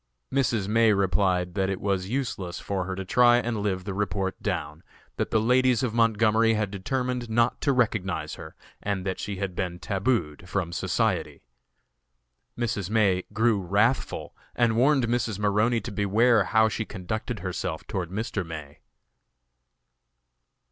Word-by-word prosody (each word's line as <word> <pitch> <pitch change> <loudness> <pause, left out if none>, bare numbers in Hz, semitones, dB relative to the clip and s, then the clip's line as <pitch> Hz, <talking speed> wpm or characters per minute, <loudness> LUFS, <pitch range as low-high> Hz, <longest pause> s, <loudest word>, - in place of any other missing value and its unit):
Mrs. 115 -7 +1
May 115 0 +4
replied 95 -2 +1
that 95 -1 0
it 95 - -2
was 95 -2 -1
useless 115 -9 -3
for 95 -2 -3
her 95 +1 -4
to 95 0 -5
try 120 +4 +5
and 120 -2 -1
live 95 -3 -1
the 100 0 -4
report 100 -1 -2
down; 75 +2 -3 0.4
that - - -1
the 110 - +2
ladies 125 +1 +3
of 120 -4 -1
Montgomery 115 0 +3
had 105 -2 -1
determined 125 +4 -2
not 120 +2 +1
to 140 - +2
recognize 100 - 0
her, 80 -1 -10 0.3
and 100 -2 -2
that 95 -1 -2
she 100 - -4
had 95 -2 -4
been 90 -1 -3
tabooed 95 - -1
from 90 -2 -2
society. 85 - -1 1.1
Mrs. 105 -6 -2
May 100 -4 +2
grew 110 -2 +2
wrathful 105 +8 0 0.2
and 115 -2 +2
warned 135 +2 +4
Mrs. 115 -3 -1
Maroney 105 +3 +2
to 120 - -6
beware 105 +2 +3
how 110 +2 +4
she 110 0 -2
conducted 110 +2 -5
herself 90 -3 -4
toward 90 -4 -3
Mr. 100 0 -3
May. 75 -4 -9
105 Hz, 150 wpm, -26 LUFS, 95-115 Hz, 1.1 s, try